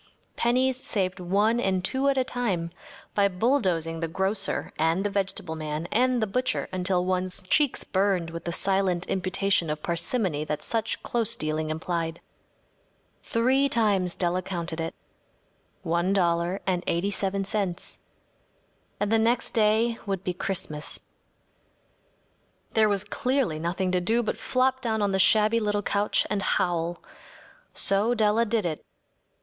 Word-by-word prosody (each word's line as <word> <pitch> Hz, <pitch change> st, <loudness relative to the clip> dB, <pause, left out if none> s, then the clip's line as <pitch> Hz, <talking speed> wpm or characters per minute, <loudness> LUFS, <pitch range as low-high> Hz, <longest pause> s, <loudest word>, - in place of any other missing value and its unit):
Pennies 255 Hz, +2 st, +2 dB
saved 190 Hz, -8 st, -2 dB
one 205 Hz, +6 st, +2 dB
and 190 Hz, -4 st, 0 dB
two 270 Hz, +6 st, +1 dB
at 275 Hz, -, +1 dB
a 260 Hz, -, +3 dB
time 200 Hz, -10 st, -2 dB, 0.4 s
by 200 Hz, -1 st, +4 dB
bulldozing 180 Hz, -, 0 dB
the 165 Hz, -, -1 dB
grocer 190 Hz, +3 st, -1 dB
and 165 Hz, +4 st, +2 dB
the 205 Hz, -, -1 dB
vegetable 190 Hz, -4 st, -2 dB
man 155 Hz, +1 st, -4 dB
and 250 Hz, 0 st, +2 dB
the -, -, +3 dB
butcher 250 Hz, +5 st, -1 dB
until 180 Hz, -1 st, +1 dB
one’s 185 Hz, 0 st, 0 dB
cheeks 280 Hz, +8 st, +2 dB
burned 190 Hz, -4 st, 0 dB
with 165 Hz, 0 st, -7 dB
the 170 Hz, -, -1 dB
silent 190 Hz, -1 st, +1 dB
imputation 190 Hz, -2 st, 0 dB
of 150 Hz, 0 st, -3 dB
parsimony 170 Hz, -, 0 dB
that 150 Hz, -1 st, -3 dB
such 225 Hz, -1 st, -2 dB
close 230 Hz, -3 st, -1 dB
dealing 155 Hz, 0 st, -2 dB
implied. 165 Hz, +1 st, -2 dB, 1.0 s
Three 260 Hz, +4 st, +2 dB
times 200 Hz, -7 st, +1 dB
Della 180 Hz, 0 st, 0 dB
counted 170 Hz, -3 st, -4 dB
it. 165 Hz, -, -4 dB, 0.9 s
One 175 Hz, +2 st, +1 dB
dollar 175 Hz, 0 st, +1 dB
and 180 Hz, -2 st, 0 dB
eighty 180 Hz, +4 st, 0 dB
seven 195 Hz, 0 st, -1 dB
cents. 190 Hz, -3 st, -2 dB, 1.0 s
And 205 Hz, 0 st, 0 dB
the 225 Hz, -, +4 dB
next 230 Hz, +2 st, +2 dB
day 225 Hz, +1 st, +2 dB
would 195 Hz, -2 st, -2 dB
be 180 Hz, -, -1 dB
Christmas. 170 Hz, -5 st, -4 dB, 1.7 s
There 220 Hz, -1 st, +4 dB
was 200 Hz, -1 st, 0 dB
clearly 245 Hz, -, 0 dB
nothing 180 Hz, +3 st, -1 dB
to 180 Hz, -1 st, +1 dB
do 225 Hz, +6 st, +1 dB
but 215 Hz, -, -1 dB
flop 260 Hz, +1 st, +1 dB
down 220 Hz, -3 st, 0 dB
on 200 Hz, -, +1 dB
the 190 Hz, -, +1 dB
shabby 215 Hz, +3 st, +4 dB
little 205 Hz, -1 st, 0 dB
couch 205 Hz, +1 st, +1 dB
and 205 Hz, -1 st, -1 dB
howl. 175 Hz, -2 st, 0 dB, 0.7 s
So 210 Hz, +5 st, +3 dB
Della 220 Hz, +1 st, +3 dB
did 220 Hz, -3 st, 0 dB
it. 160 Hz, -3 st, -3 dB
195 Hz, 145 wpm, -26 LUFS, 175-220 Hz, 1.7 s, by